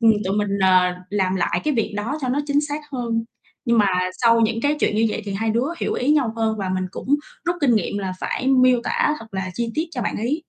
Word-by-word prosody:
ừm, 225 -1 +6
tụi 195 +2 -1
mình, 200 -1 0
ờ, 185 -1 +4 0.2
làm 190 -2 0
lại 185 - 0
cái 300 -2 +1
việc 225 -2 0
đó 235 +9 -2
cho 255 - -2
nó 275 +4 +1
chính 285 0 +2
xác 295 0 -3
hơn. 230 -3 -1 0.4
Nhưng 235 -2 +2
mà 205 - +5 0.4
sau 230 0 +5
những, 225 0 +1
cái, 295 +1 +2
chuyện 210 - +1
như 225 +1 +3
vậy 215 - -3
thì 200 - -4
hai 220 +2 0
đứa 235 +5 +1
hiểu - - -1
ý 260 +4 0
nhau 275 -7 +2
hơn 220 -1 0
và 195 - -2
mình 185 0 -1
cũng - - -8 0.4
rút 345 +1 0
kinh 255 -5 +4
nghiệm 205 -1 -1
là 190 -2 -3
phải 260 - -2
miêu 255 -2 +5
tả 300 - +1
thật 225 - -10
là 190 -1 -3
chi 235 -1 -2
tiết 315 - 0
cho 245 -7 -4
bạn - - -2
ấy. 280 +9 -2
230 Hz, 265 wpm, -22 LUFS, 205-260 Hz, 0.4 s, ừm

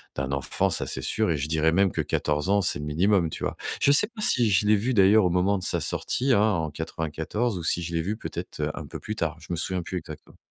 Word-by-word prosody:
d'un 70 0 -3
enfant, 70 -2 0
ça, - - -1
c'est 65 - -2
sûr. 105 - 0
Et 75 - 0
je 75 +2 -3
dirais 80 0 +2
même 95 +1 +3
que - - -5
14 75 +2 -1
ans, 100 +1 +3
c'est 90 - +1
le 75 - -5
minimum, 85 +3 +2
tu - - -7
vois? - - -3 0.2
Je 140 - +5
sais 145 +9 +6
pas 225 -2 -10
si 120 - +3
je 100 +1 +2
l'ai 105 -1 +5
vu 125 +6 -1
d'ailleurs 100 0 +5
au - - +3
moment 90 +3 +1
de 95 - -6
sa - - 0
sortie, 130 +2 0
hein, 100 - +4
en 80 -3 -2
94 80 +8 -3
ou 85 - -6
si 85 +1 +1
je 85 +1 -5
l'ai 85 - 0
vu 100 +6 -3
peut-être, 110 - -7
heu, - - -1
un - - -7
peu - - -8
plus 110 - -5
tard. 80 -1 -2
Je 80 - -13
me 85 - -1
souviens 90 +2 -2
plus 90 - -5
exactement. 80 -3 -10
90 Hz, 280 wpm, -25 LUFS, 80-105 Hz, 0.2 s, sais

